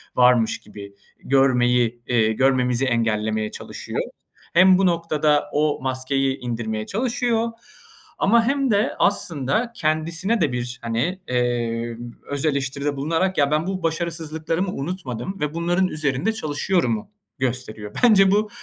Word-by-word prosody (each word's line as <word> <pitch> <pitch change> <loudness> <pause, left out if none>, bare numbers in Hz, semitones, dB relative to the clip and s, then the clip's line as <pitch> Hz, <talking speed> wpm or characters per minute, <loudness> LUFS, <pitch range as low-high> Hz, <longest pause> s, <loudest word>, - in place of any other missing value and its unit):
varmış 125 -2 +4
gibi 100 -1 -11 0.3
görmeyi, 125 -3 +2
ııı, 115 -3 +3
görmemizi 125 +1 +2
engellemeye 110 -3 0
çalışıyor. - - -6 0.5
Hem 185 +2 +6
bu 195 - +2
noktada 155 -4 +2
o 150 0 +1
maskeyi 135 +1 -1
indirmeye 115 -3 -3
çalışıyor 230 - 0 0.7
ama 230 +3 +4
hem 275 -1 +1
de 205 +1 +2
aslında 170 - 0
kendisine 165 +7 0
de 150 -5 +2
bir, 120 0 -4
hani, 120 +11 -1
eee, 120 -2 -1 0.3
öz 145 +1 -2
eleştiride 140 0 -1
bulunarak 165 +6 0
"Ya, 145 -1 +3
ben 155 +3 +1
bu 190 -1 -3
başarısızlıklarımı 165 +1 -2
unutmadım 165 - -5
ve 150 0 -2
bunların 175 +3 +1
üzerinde 155 - -1
çalışıyorum."u 150 - -1 0.3
gösteriyor. 115 -5 -4
Bence 195 -5 +6
bu, 210 +1 +2
145 Hz, 120 wpm, -22 LUFS, 125-180 Hz, 0.7 s, Hem